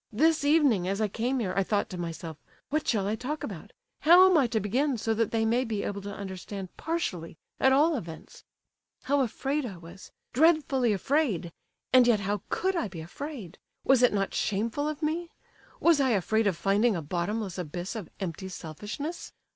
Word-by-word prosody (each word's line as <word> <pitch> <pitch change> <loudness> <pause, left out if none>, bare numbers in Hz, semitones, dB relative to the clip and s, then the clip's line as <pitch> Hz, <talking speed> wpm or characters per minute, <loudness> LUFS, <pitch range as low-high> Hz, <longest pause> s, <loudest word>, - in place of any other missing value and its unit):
This 310 +7 +3
evening 285 - +3
as 195 +2 -1
I 215 - +2
came 240 +6 -1
here, 200 -7 -1
I 195 - +3
thought 205 +1 0
to - - -5
myself, 165 -2 -6 0.3
'What 310 +1 0
shall 205 -5 +1
I 210 - 0
talk 275 +7 -4
about? - - -7 0.3
How 355 +4 +8
am 370 - +4
I 280 -6 +4
to 230 -2 0
begin, 255 +7 0
so 225 +1 0
that 225 -1 0
they 225 -1 0
may 235 +3 +2
be 220 -4 -3
able 200 0 -4
to 200 +1 -6
understand 195 -1 -7
partially, 185 - -3 0.2
at 265 - +5
all 300 +4 +4
events?' 165 - -8 0.6
How 285 +1 +1
afraid 270 +4 -1
I 205 -8 -6
was—dreadfully 255 - 0
afraid! 210 - 0 0.4
And 255 -1 +7
yet, 220 -4 +3
how 200 0 -2
could 380 +1 0
I 335 - 0
be 175 -4 -8
afraid—was 260 - -2
it 250 - +5
not 195 -1 -1
shameful 230 +9 -1
of 305 +1 -6
me? 330 +3 -1 0.5
Was 330 -4 +4
I 265 - +3
afraid 220 +4 +1
of 185 -4 0
finding 205 +4 +2
a 165 - -3
bottomless 185 +4 -3
abyss 175 +4 -5
of 210 -7 -6
empty 190 0 -5
selfishness? 210 - -6
220 Hz, 185 wpm, -28 LUFS, 190-285 Hz, 0.6 s, How